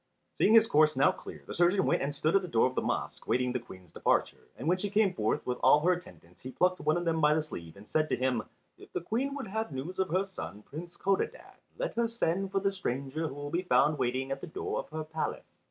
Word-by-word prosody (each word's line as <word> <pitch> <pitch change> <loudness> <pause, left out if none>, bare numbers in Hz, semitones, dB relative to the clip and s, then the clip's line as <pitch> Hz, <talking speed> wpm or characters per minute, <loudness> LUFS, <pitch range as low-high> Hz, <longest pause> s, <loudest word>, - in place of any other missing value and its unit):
Seeing 220 - +4
his 225 -1 +8
course 155 -6 +4
now 140 +8 +5
clear - - -10
the - - -7
surgeon 180 +2 +3
went - - +2
and 140 +1 -2
stood 155 +4 +1
at 195 - +5
the 180 - -5
door 115 -9 +3
of 130 - 0
the - - 0
mosque, - - -3
waiting 125 0 +1
the 125 - -1
Queen's 95 -7 -14
departure, - - 0
and - - -5
when 180 +2 +3
she 205 - -2
came 205 -2 +3
forth 110 -10 -1
with 125 0 -2
all 150 - +6
her 180 +4 +4
attendants 90 - -11
he 130 - -7
plucked 180 +6 +1
one 155 +3 +2
of 175 - -2
them 165 -1 +1
by 150 0 +5
the 155 - +1
sleeve 85 - -9
and 100 +2 -14
said 155 0 +1
to - - +2
him, 130 -2 0 0.4
"If - - -14
the - - -2
Queen 255 +10 -1
would 280 - -4
have 220 -2 -3
news 145 +8 -5
of 190 - +1
her 185 +4 +1
son, 105 - -8
Prince 170 +7 -9
Codadad, 195 0 -1 0.2
let - - -2
her 235 0 +1
send 195 -4 -1
for 195 - +1
the 195 0 +1
stranger 140 -2 -3
who 135 - -7
will 145 0 -6
be 170 +2 +1
found 155 -4 +3
waiting 130 +2 -1
at 135 0 -3
the - - -6
door 160 - -3
of - - -6
her 155 0 -4
palace." 160 +1 -4
160 Hz, 265 wpm, -30 LUFS, 130-185 Hz, 0.4 s, his